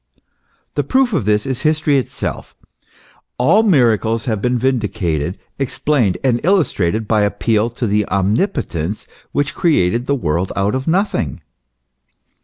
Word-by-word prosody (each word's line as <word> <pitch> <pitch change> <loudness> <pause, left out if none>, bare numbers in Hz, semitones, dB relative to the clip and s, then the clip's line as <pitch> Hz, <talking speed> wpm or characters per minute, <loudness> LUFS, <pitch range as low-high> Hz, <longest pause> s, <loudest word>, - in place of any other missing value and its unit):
The - - 0
proof 260 -3 +2
of 150 - 0
this 105 0 +1
is 135 -1 -3
history 155 -2 +2
itself; 130 - -5 0.8
all 165 - +4
miracles 115 - +2
have 110 -5 -1
been 125 +1 +1
vindicated, 100 - -1 0.2
explained, 135 -6 0
and 125 -3 +2
illustrated 110 - +1
by 110 -1 +2
appeal 105 +2 +1
to 120 +1 -4
the 105 -1 +1
omnipotence 100 - -1 0.3
which 145 -1 -1
created 120 - +1
the 140 - +2
world 85 - -1
out 100 +1 0
of 130 0 -3
nothing. 165 - 0
115 Hz, 130 wpm, -18 LUFS, 100-140 Hz, 0.8 s, all